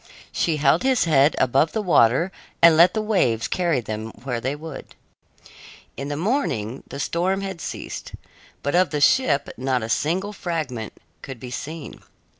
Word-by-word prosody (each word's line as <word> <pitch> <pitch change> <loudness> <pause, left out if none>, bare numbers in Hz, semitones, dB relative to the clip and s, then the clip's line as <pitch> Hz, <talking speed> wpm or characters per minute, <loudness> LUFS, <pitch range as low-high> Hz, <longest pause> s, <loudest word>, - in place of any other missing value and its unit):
She 160 -3 0
held 140 -1 +3
his 260 -1 +2
head 150 -2 +4
above 135 +5 +2
the 220 - 0
water 165 - +3 0.3
and 165 -1 +7
let 170 +4 +6
the 215 - 0
waves 125 - +1
carry 170 -8 0
them 110 0 -5
where 125 -3 -3
they 130 +4 -2
would. 155 -1 -9 1.0
In 140 - -5
the 145 0 -3
morning 155 - -1
the 140 - -8
storm 180 +6 0
had 190 -4 -5
ceased, - - -6 0.5
but 145 - -1
of 180 -1 +3
the 150 0 -2
ship 145 - +3
not 130 -2 -1
a 110 - -5
single 185 - 0
fragment 155 - -4 0.3
could 130 -3 -8
be 125 0 -8
seen. 155 +3 -7
150 Hz, 165 wpm, -23 LUFS, 130-180 Hz, 1.0 s, and